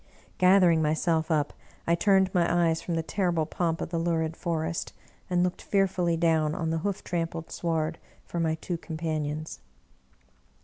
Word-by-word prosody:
Gathering 180 -3 +5
myself 160 +1 +1
up, 150 -2 +1 0.3
I 170 - +2
turned 190 +1 +3
my 175 -2 +2 0.2
eyes 160 0 -1
from 170 - -3
the 165 - -1
terrible 175 -3 0
pomp 165 0 -1
of - - -3
the 170 -1 -1
lurid 165 -1 0
forest, 165 -1 -2 0.4
and 180 -1 +2
looked 180 0 -2
fearfully 185 -4 +1
down 160 -2 +2
on 160 -2 -1
the 165 - 0
hoof 200 +3 -3
trampled 165 -1 -3
sward 160 -1 -1 0.3
for 170 - -4
my 160 -1 +1
two 170 +1 -4
companions. 155 -2 -4
165 Hz, 160 wpm, -27 LUFS, 160-175 Hz, 0.4 s, Gathering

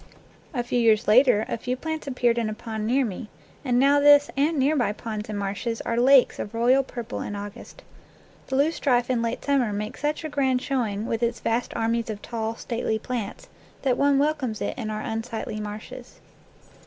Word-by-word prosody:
A 245 -6 -2
few 245 +1 -1
years 225 -3 +3
later 225 -1 +5
a - - -3
few 250 +2 -3
plants 315 +2 -5
appeared 240 -3 +1
in 225 -2 -1
a 215 - -4
pond 220 -1 -5
near 260 +3 +2
me, 215 +1 -6 0.3
and 250 -3 +1
now 280 +2 +5
this 290 0 +6
and 295 +4 +1
near 280 +3 +2
by 240 -7 +1
ponds 215 -1 -6
and 210 - -3
marshes 205 +4 -3
are 230 - -2
lakes 255 +2 +5
of 205 - -5
royal 245 +4 +4
purple 240 -2 -6
in 205 - -5
August. 205 0 -9 0.6
The 265 - -2
loosestrife 265 -4 +2
in 240 -2 +1
late 230 0 -3
summer 270 -6 +2
makes 210 +1 -5
such 300 +2 -1
a 315 - -4
grand 265 -3 +1
showing 230 -6 -2
with 225 -1 -2
its 235 0 0
vast 235 +2 -1
armies 230 +1 0
of 210 -2 -4
tall, 225 -1 -3
stately 230 -1 -2
plants 240 - -5 0.4
that 260 -2 +2
one 280 +1 +3
welcomes 280 -6 0
it - - -3
to 240 -4 -5
our 215 0 -4
un 225 0 -2
sightly 225 -2 -5
marshes. 210 0 -8
240 Hz, 200 wpm, -25 LUFS, 220-270 Hz, 0.6 s, this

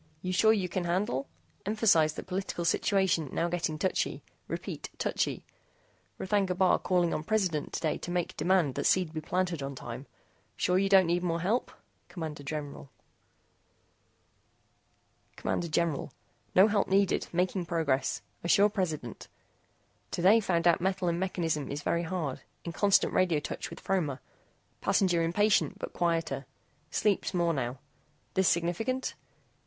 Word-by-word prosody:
YOU 185 0 -2
SURE 220 +4 +5
YOU 195 -4 0
CAN 180 0 -2
HANDLE? 170 -6 -1 0.4
EMPHASIZE 200 -8 +3
THAT - - -7
POLITICAL 185 -2 -3
SITUATION 185 -5 +2
NOW 170 - +1
GETTING 170 -2 -1
TOUCHY. 185 +4 -1 0.2
REPEAT - - -5
TOUCHY. - - -1 0.7
R'THAGNA 190 -1 +1
BAR 185 -1 +4
CALLING 175 -2 +1
ON 155 - -2
PRESIDENT 185 -6 0
TODAY 155 - -1
TO - - -7
MAKE 175 -1 -2
DEMAND 175 -6 +2
THAT - - 0
SEED 180 -4 +2
BE 155 - -3
PLANTED 180 -1 -1
ON 135 0 -4
TIME. 120 +2 -7 0.5
SURE 180 +1 +2
YOU 195 0 +1
DON'T 190 -2 +7
NEED 175 +1 +1
MORE 170 -2 -1
HELP? 215 +8 0 0.4
CMD 160 -5 -6
GENERAL 145 -1 -6 2.5
CMD 170 - -2
GENERAL 155 -3 0 0.4
NO 190 +3 +8
HELP 205 -2 +1
NEEDED. 195 0 +2
MAKING 180 +1 0
PROGRESS, 150 -6 0 0.2
ASSURE 200 +4 +5
PRESIDENT. 160 - -3 0.8
TODAY 190 +6 +5
FOUND 175 -5 +1
OUT 170 0 +4
METAL 185 -1 0
IN 170 0 -1
MECHANISM 165 -6 -1
IS 145 +1 -4
VERY 170 - +1
HARD. 160 -6 -3 0.2
IN 170 - -3
CONSTANT 200 +2 +3
RADIO 175 -5 +3
TOUCH - - -5
WITH - - -9
FROMER. 155 -9 -1 0.6
PASSENGER 175 -4 +2
IMPATIENT 200 +5 +2
BUT - - -6
QUIETER. 165 -6 -1 0.4
SLEEPS 205 -2 0
MORE 170 -1 +2
NOW. 130 -2 -2 0.6
THIS 190 -1 +3
SIGNIFICANT? 200 +10 0
175 Hz, 140 wpm, -30 LUFS, 160-190 Hz, 2.5 s, NO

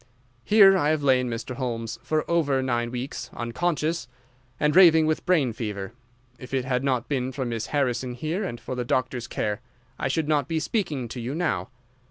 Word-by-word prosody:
Here 200 - +7
I 150 -6 +2
have 155 -2 +1
lain, 130 -2 +3
Mr. 115 +2 -5
Holmes, 115 -4 -3
for 155 -1 -1
over 145 -6 +1
nine 120 -2 0
weeks, 125 +3 -5
unconscious, 150 +3 -1 0.5
and 150 +1 +2
raving 165 -4 +7
with 155 0 -1
brain 150 -10 +3
fever. 105 -2 -5 0.5
If 130 +1 -5
it 130 -1 0
had 125 0 0
not 130 -3 0
been 130 -2 -1
for 130 0 -3
Miss 115 -2 -3
Harrison 130 -3 -1
here 160 - -2
and 120 -11 -4
for - - -6
the 125 -1 -2
doctor's 125 -1 -1
care 105 -2 -2 0.4
I - - 0
should 150 +3 0
not 145 -3 +1
be 160 0 0
speaking 155 - -2
to 120 +1 -6
you 125 +5 -3
now. 175 -3 -1
130 Hz, 190 wpm, -25 LUFS, 120-155 Hz, 0.5 s, Here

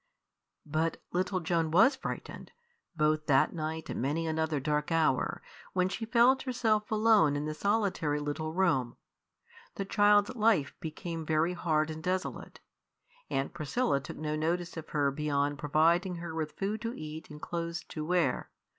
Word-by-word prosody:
But 160 +2 0
little 185 +1 0
Joan 165 -1 0
was 210 - +5
frightened, - - -6 0.4
both 155 0 +1
that 135 -3 +4
night 160 -1 -4
and - - -4
many 150 +6 0
another 160 -1 0
dark 150 +2 -1
hour, 160 -5 +1 0.3
when 185 0 +2
she 220 +4 -4
felt 245 +3 +5
herself 225 -5 0
alone 215 -9 +4
in 145 +1 -2
the 155 - -2
solitary 190 -5 0
little 150 +2 -3
room. 160 -9 +1 0.8
The 195 - -3
child's 205 +3 +4
life 215 - +2
became 165 +1 -5
very 160 +3 +1
hard 160 -3 0
and 155 0 -7
desolate. 185 +3 -3 0.7
Aunt 135 0 -1
Priscilla 170 - 0
took 140 - -9
no 155 0 -2
notice 170 +3 -1
of 160 -2 -7
her 145 -2 +1
beyond 145 0 -1
providing 165 +5 +2
her 170 -1 -6
with 160 -1 -3
food 205 +3 -2
to 230 +1 -3
eat 155 +1 -7
and 150 0 -10
clothes 170 +1 -4
to 155 - -5
wear. 170 -5 0
160 Hz, 155 wpm, -30 LUFS, 150-190 Hz, 0.8 s, was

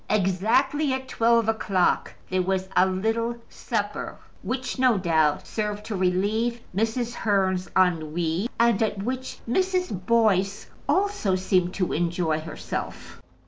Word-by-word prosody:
Exactly 220 +9 +2
at 260 0 -4
twelve 230 -2 +2
o'clock 210 -5 +1
there 185 0 0
was 190 +1 -1
a 185 - +5
little 225 +5 -1
supper, 210 -3 -3 0.2
which, 255 +5 -3
no 255 -4 +4
doubt, 160 -5 +2
served 210 -1 -3
to 220 - -4
relieve 205 +6 0 0.2
Mrs. 225 +3 0
Hearn's 190 -4 0
ennui, 170 +2 +1
and 235 -3 +3
at 205 -3 0
which 260 +3 -4
Mrs. 360 - 0
Boyce 205 -4 +2 0.2
also 390 - +1
seemed 185 -1 +1
to 185 -2 -1
enjoy 170 -1 0
herself. 155 -1 -6
205 Hz, 125 wpm, -25 LUFS, 185-235 Hz, 0.2 s, a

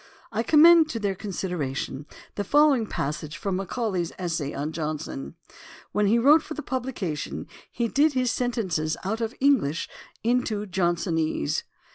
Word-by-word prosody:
I 225 0 0
conunend 320 +5 +7
to 230 - -3
their 200 -2 0
consideration 165 -8 -4 0.3
the 205 - -2
following 280 0 +4
passage 150 0 -4
from 195 +3 -2
Macaulay's 190 -2 -2
Essay 165 -6 -2
on 145 +3 -3
Johnson: 155 - -4 0.6
When 210 -1 +2
he 225 +4 +4
wrote 290 +7 +6
for 310 -1 -7
publication, 245 - -4 0.3
he 235 - -1
did 290 +5 +3
his 255 -2 +1
sentences 190 -11 -1
out 220 +4 -2
of 225 +2 -2
English 245 - +2 0.4
into 225 -3 0
Johnsonese. 170 - 0
200 Hz, 135 wpm, -26 LUFS, 160-250 Hz, 0.6 s, conunend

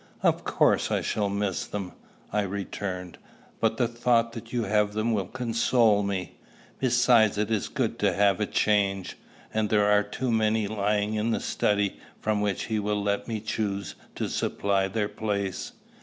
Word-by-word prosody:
"Of - - +2
course - - +2
I - - +1
shall 105 -2 -1
miss 100 -2 -2
them," 100 -3 -5 0.4
I 105 - +2
returned; 95 -2 -5 0.4
"but 115 0 +1
the 120 - +2
thought 115 0 +2
that 115 -1 -9
you 120 -2 0
have 105 0 +1
them 110 +2 0
will 100 -4 -1
console 115 -3 +2
me. 100 -2 -3 0.4
Besides, 120 -4 +4
it 105 +1 0
is 110 -3 0
good - - -2
to - - +3
have 100 0 +3
a 105 - 0
change; 100 -3 +1 0.4
and 110 -1 0
there 105 -1 +3
are 105 0 +5
only 105 0 -4
too 125 +3 -2
many 110 -1 +2
lying 105 0 0
in 110 +1 0
the 115 - +1
study, 100 -1 0 0.2
from 105 -1 0
which 100 -3 -1
he 110 -1 -1
will 105 0 -1
let 100 0 -1
me 110 -2 -2
choose 100 -4 -2 0.2
to - - -2
supply 100 -1 0
their 105 +2 -1
place." 100 -3 -3
105 Hz, 175 wpm, -27 LUFS, 100-110 Hz, 0.4 s, are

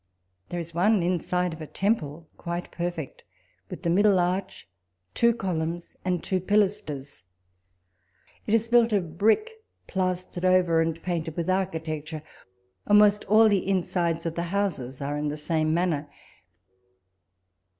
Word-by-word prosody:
There 175 - -3
is 170 0 -7
one 190 +3 +3
inside 180 0 0
of 160 - -10
a 155 - -6
temple 165 -7 -1
quite 170 +1 -5
perfect, 175 -4 -5 0.5
with - - -8
the 170 - 0
middle 200 +2 +4
arch, 185 +2 -1 0.5
two 235 0 +4
columns, 170 -6 -3
and 180 -2 -1
two 190 - 0
pilasters. 185 -8 -1 1.3
It 220 - +3
is 225 0 +1
built 235 -1 +4
of 170 -5 -1
brick 415 - +3 0.3
plastered 185 -1 -2
over, 180 -3 +4
and 165 0 -1
painted 165 -3 -3
with 170 +2 0
architecture: 160 -4 -3 0.6
almost 210 0 +5
all 220 +2 +6
the 200 -3 +1
insides 170 -3 0
of 165 - -1
the 170 - -3
houses 150 -10 -2
are 145 +1 -2
in 150 - -1
the 150 +1 -3
same 155 0 0
manner; 160 -3 0
and. - - -30
175 Hz, 140 wpm, -26 LUFS, 160-195 Hz, 1.3 s, all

